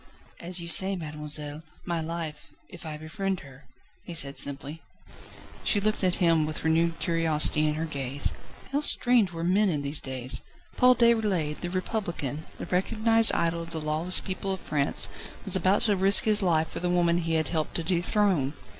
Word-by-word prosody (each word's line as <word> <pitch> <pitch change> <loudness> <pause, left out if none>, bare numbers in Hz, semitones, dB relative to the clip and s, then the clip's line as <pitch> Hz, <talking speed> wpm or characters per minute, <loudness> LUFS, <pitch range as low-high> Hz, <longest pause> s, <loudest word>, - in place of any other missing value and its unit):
"As 180 +1 -4
you 170 - -6
say, 190 +3 +3
mademoiselle, 150 -2 -5 0.2
my 170 -2 -2
life, 160 -2 -6 0.2
if 175 -2 -11
I 155 -1 -6
befriend 190 +4 -4
her," 135 0 -16 0.4
he 175 - -8
said 140 -3 0
simply. 145 +3 -1 0.8
She 205 - +1
looked 215 0 -1
at 180 -1 +1
him 165 -3 +2
with 155 - -6
renewed 165 +1 +1
curiosity 155 -2 +2
in 150 - -1
her 160 +1 -3
gaze. 140 -2 -1 0.4
How 280 - 0
strange 245 -8 +3
were 165 -1 -6
men 195 +4 +2
in 150 -5 -2
these 140 +2 0
days! 130 -1 -2 0.3
Paul 250 0 +5
Déroulède, 210 -11 +1
the 175 - -4
republican, 175 - -4
the - - -7
recognised 225 +4 +4
idol 170 0 0
of 165 - -8
the 165 -1 -6
lawless 155 +4 +2
people 190 +1 -5
of 190 - -3
France, 145 -3 +2 0.4
was - - +4
about 190 +2 +2
to 210 -3 +2
risk 195 +5 +5
his 215 -3 +3
life 160 -4 +1
for - - -7
the 180 - -2
woman 175 -1 +1
he 165 -1 -2
had 155 -3 -1
helped 160 -3 -3
to 170 - -2
dethrone. 175 -4 0
170 Hz, 180 wpm, -26 LUFS, 155-190 Hz, 0.8 s, Paul